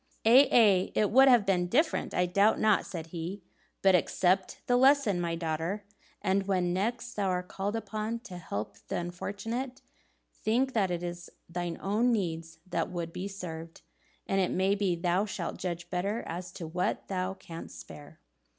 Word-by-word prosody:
"Aye, 255 +5 +7
aye, 200 -6 +5
it 210 - +2
would 265 +4 +7
have 240 -5 +6
been 180 -3 +2
different, 305 - +1
I 180 - +3
doubt 200 +5 +3
not," 215 -1 +3
said 165 -3 -6
he; 175 +3 -5 0.4
"but 190 -1 +6
accept 185 +1 +2
the 245 - +2
lesson, 260 -7 +4
my 170 -1 -1
daughter, 165 +5 -2 0.4
and 195 +1 +1
when 180 -3 +1
next 235 +5 -2
thou 200 -2 -1
art 180 -1 -1
called 200 +3 -3
upon 220 +1 -3
to 180 -6 -9
help 105 -10 -5
the - - -3
unfortunate, 225 +9 -4 0.5
think 255 +4 0
that 200 -5 +2
it 175 -1 -2
is 175 0 -6 0.2
thine 175 0 -4
own 215 +5 +2
needs 165 -6 -2
that - - -1
would 170 -2 -4
be 190 - -4
served; 165 -4 -7 0.4
and 195 0 +1
it 185 - +1
may 190 +2 +2
be 195 -3 +1
thou 175 +3 +1
shalt 190 -5 -4
judge 170 -2 -4
better 200 +5 -1
as 175 +1 -5
to 170 - -6
what 175 +3 -2
thou 185 0 -2
canst 165 -4 -9
spare." 150 +2 -12
190 Hz, 175 wpm, -30 LUFS, 175-215 Hz, 0.5 s, Aye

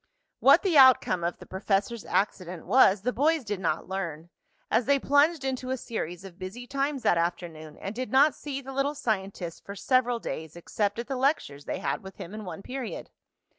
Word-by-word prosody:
What - - +6
the 350 -7 +4
outcome 255 -9 +6
of 170 +1 -2
the - - -12
professor's 200 +4 -1
accident 185 -4 -2
was 200 -6 +5
the 250 - 0
boys 305 +5 +2
did 205 -3 -4
not 165 -3 -1
learn, 170 -3 -5 0.4
as 225 +2 +3
they 280 +1 +4
plunged 285 +2 +2
into 255 -1 -3
a 260 - -1
series 185 -7 -5
of 180 -2 -12
busy 195 +7 -7
times 275 +1 -2
that 170 - +3
afternoon 165 -3 -4
and 195 - -6
did 255 +2 -5
not 280 +3 +5
see 275 -2 -6
the 270 0 -8
little 275 +2 0
scientist 195 - -3
for 200 - -8
several 245 +3 +2
days 160 -8 -6
except 200 +4 -2
at 235 - -3
the 270 - -4
lectures 250 - 0
they - - -3
had 140 - -2
with 190 0 -11
him 175 - -9
in 215 -1 -7
one 180 +1 -7
period. 260 -3 -6
215 Hz, 200 wpm, -27 LUFS, 180-265 Hz, 0.4 s, What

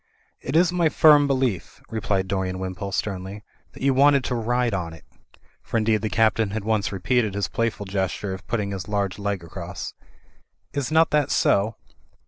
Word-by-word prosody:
"It 135 - -4
is 175 +1 +4
my 175 -3 +2
firm 150 -2 +6
belief," 130 -9 -1
replied 100 -4 -1
Dorian 95 -1 -2
Wimpole, 95 +1 -5
sternly, 95 +1 -4 0.3
"that - - -10
you 135 0 +4
wanted 140 0 +5
to 130 - -2
ride 120 0 0
on 85 -4 -3
it" 80 - -14 0.6
(for - - -3
indeed 110 -1 +2
the 110 - -1
Captain 110 -1 +2
had 105 +1 -4
once 110 -1 0
repeated 105 +2 0
his 100 -3 0
playful 115 -1 -2
gesture 95 0 -2
of 95 -2 -9
put 120 - 0
ting 100 -2 -3
his 95 -2 -5
large 100 -2 -1
leg 100 -3 -2
across). 85 +2 -7 0.8
"Is 140 0 -2
not 160 +1 +4
that 150 -2 +2
so?" 105 -2 +2
105 Hz, 180 wpm, -24 LUFS, 95-125 Hz, 0.8 s, firm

